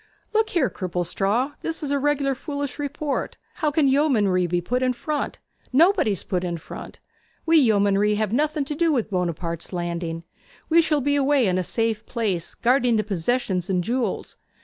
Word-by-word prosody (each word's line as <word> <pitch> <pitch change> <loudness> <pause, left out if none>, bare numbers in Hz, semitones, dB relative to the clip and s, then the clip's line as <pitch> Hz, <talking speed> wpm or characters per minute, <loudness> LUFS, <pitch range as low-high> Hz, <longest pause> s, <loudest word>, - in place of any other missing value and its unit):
'Look 440 0 +2
here, 325 -8 +2
Cripplestraw. 195 - -1
This 325 -1 -3
is 285 - -2
a 285 - +2
reg'lar 280 -1 +1
foolish 285 +1 -5
report. 290 0 -3 0.2
How 310 - +1
can 295 -1 +2
yeomanry 220 - +3
be 175 +1 0
put 245 +9 -1
in 255 -1 +2
front? 295 +5 -3 0.3
Nobody's 305 - +3
put 180 -3 -2
in 175 -1 -2
front. 155 - -10 0.5
We 325 0 +5
yeomanry 205 -4 +3
have 215 0 -1
nothing 300 +2 +1
to 295 - -3
do 330 +2 +2
with 235 -7 0
Buonaparte's 170 -2 -2
landing. 170 -2 -3 0.5
We 335 +1 +6
shall 305 -3 +1
be 285 +2 +1
away 280 -2 +3
in 185 -2 +1
a - - 0
safe 225 +2 -1
place, 200 -8 -2
guarding 245 -1 +2
the 215 - +2
possessions 195 -1 -1
and 180 -2 +1
jewels. 235 0 -2
240 Hz, 170 wpm, -24 LUFS, 185-285 Hz, 0.5 s, We